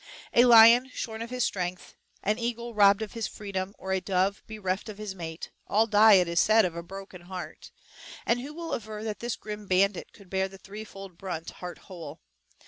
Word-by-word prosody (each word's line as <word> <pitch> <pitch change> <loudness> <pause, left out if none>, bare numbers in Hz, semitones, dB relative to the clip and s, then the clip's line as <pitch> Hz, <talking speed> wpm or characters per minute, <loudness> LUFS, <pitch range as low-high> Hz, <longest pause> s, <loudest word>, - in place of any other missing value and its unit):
A 240 - +6
lion 235 +2 +8
shorn 220 -2 -5
of 230 - -5
his 250 -1 -1
strength, 180 -2 -3 0.3
an 210 +4 0
eagle 235 0 -3
robbed 205 0 +5
of 215 - -8
his 230 -3 -2
freedom, 195 -1 -5
or 190 - -6
a 190 -1 +1
dove 190 +2 0
bereft 205 -1 -3
of 210 - -8
his 210 -2 -5
mate, 165 -3 -7 0.2
all 220 +2 +3
die, 215 0 +6
it 180 -3 +5
is 170 0 +1
said, 220 -1 +5
of 175 -2 -3
a 170 - -4
broken 195 +1 -10
heart; 175 -3 -8 0.6
and 240 +1 +1
who 280 +4 -7
will 330 +1 -6
aver 215 -1 -5
that 215 -2 -4
this 240 -1 -3
grim 210 -1 -8
bandit 190 +1 +1
could 200 - -17
bear 190 0 +1
the 195 0 -13
three 210 +3 -9
fold 195 -4 -11
brunt, 170 -4 -5
heart 180 -1 -8
whole? 165 -5 -9
200 Hz, 210 wpm, -28 LUFS, 185-220 Hz, 0.6 s, lion